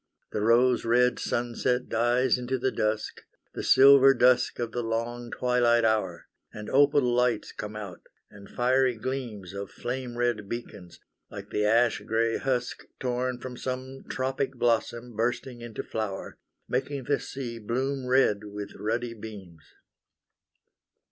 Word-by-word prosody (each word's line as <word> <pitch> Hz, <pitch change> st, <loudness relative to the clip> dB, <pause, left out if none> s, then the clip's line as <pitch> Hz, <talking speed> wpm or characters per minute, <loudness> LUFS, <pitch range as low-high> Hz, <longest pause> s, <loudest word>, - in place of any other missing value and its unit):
The 105 Hz, -, -2 dB
rose 120 Hz, +3 st, +4 dB
red 125 Hz, +2 st, +3 dB
sunset 120 Hz, +1 st, -1 dB
dies 120 Hz, +2 st, +2 dB
into 125 Hz, +1 st, -2 dB
the 130 Hz, +1 st, 0 dB
dusk, 105 Hz, 0 st, -2 dB, 0.3 s
The -, -, -4 dB
silver 135 Hz, 0 st, +7 dB
dusk 125 Hz, 0 st, +3 dB
of 120 Hz, -1 st, -3 dB
the 120 Hz, -, -2 dB
long 120 Hz, +1 st, -3 dB
twilight 120 Hz, -2 st, +2 dB
hour, 105 Hz, -6 st, 0 dB, 0.2 s
And 105 Hz, 0 st, -8 dB
opal 145 Hz, +1 st, +5 dB
lights 125 Hz, -2 st, +1 dB
come 105 Hz, 0 st, -7 dB
out, 100 Hz, -5 st, -7 dB, 0.3 s
and 100 Hz, 0 st, -13 dB
fiery 130 Hz, 0 st, +2 dB
gleams 115 Hz, -6 st, -5 dB
Of 100 Hz, 0 st, -6 dB
flame 125 Hz, 0 st, -5 dB
red 120 Hz, -4 st, -1 dB
beacons, 105 Hz, -7 st, -7 dB, 0.3 s
like -, -, -9 dB
the 105 Hz, -, 0 dB
ash 115 Hz, 0 st, +3 dB
gray 115 Hz, +2 st, 0 dB
husk 125 Hz, -2 st, -2 dB
Torn 125 Hz, 0 st, -1 dB
from 125 Hz, 0 st, -8 dB
some 130 Hz, +1 st, -5 dB
tropic 135 Hz, +1 st, -2 dB
blossom 120 Hz, 0 st, 0 dB
bursting 120 Hz, +2 st, -2 dB
into 120 Hz, -1 st, -6 dB
flower, 110 Hz, -3 st, -5 dB, 0.3 s
Making 135 Hz, +2 st, -2 dB
the 145 Hz, +3 st, 0 dB
sea 120 Hz, -4 st, -6 dB
bloom 130 Hz, +4 st, -2 dB
red 125 Hz, -5 st, +3 dB
with 105 Hz, 0 st, -7 dB
ruddy 115 Hz, +2 st, -2 dB
beams. 100 Hz, -7 st, -10 dB
120 Hz, 140 wpm, -27 LUFS, 110-130 Hz, 0.3 s, silver